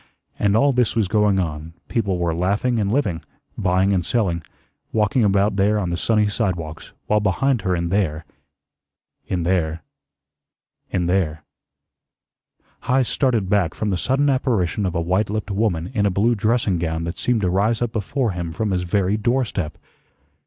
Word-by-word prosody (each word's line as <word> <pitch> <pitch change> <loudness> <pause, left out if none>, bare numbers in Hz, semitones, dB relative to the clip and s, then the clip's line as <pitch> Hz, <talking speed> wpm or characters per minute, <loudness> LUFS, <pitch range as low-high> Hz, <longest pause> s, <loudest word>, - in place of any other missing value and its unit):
And 100 +1 +3
all 140 +3 +4
this 125 -3 +1
was 110 -4 +2
going 105 -1 +2
on, 80 -2 -4
people 100 -6 0
were 85 -1 0
laughing 100 +8 0
and 100 -1 0
living, 100 - 0 0.3
buying 95 +2 +2
and 90 -2 +1
selling, 85 -4 0 0.5
walking 110 +3 +2
about 100 +1 +3
out - - -7
there 105 +2 +3
on 90 -4 -1
the - - 0
sunny 105 +3 +2
sidewalks, 90 -7 -3
while 105 - +2
behind 110 +5 +1
her 95 -1 0
in 85 0 -2
there 85 -5 0 1.0
in 90 -2 -1
there 85 -3 0 1.1
in 90 -2 -1
there 85 -4 0 1.4
Heise 130 -2 +2
started 115 -5 +1
back 95 -5 +1
from 105 -2 -1
the - - +1
sudden 135 +8 +1
apparition 110 -8 +1
of 90 - -4
a - - +1
white 95 +5 0
lipped 105 0 -3
woman 95 -4 -1
in 105 -3 +2
a - - +3
blue 105 +6 +2
dressing 110 -3 +1
gown 80 -1 -2
that 85 +1 -5
seemed 120 -3 +1
to 90 - +1
rise 105 +5 +1
up 120 -2 -1
before 115 +3 -1
him 85 -2 -4
from 105 +4 -2
his 90 -1 0
very 95 +3 +1
doorstep. 110 -7 -1
100 Hz, 175 wpm, -21 LUFS, 90-110 Hz, 1.4 s, all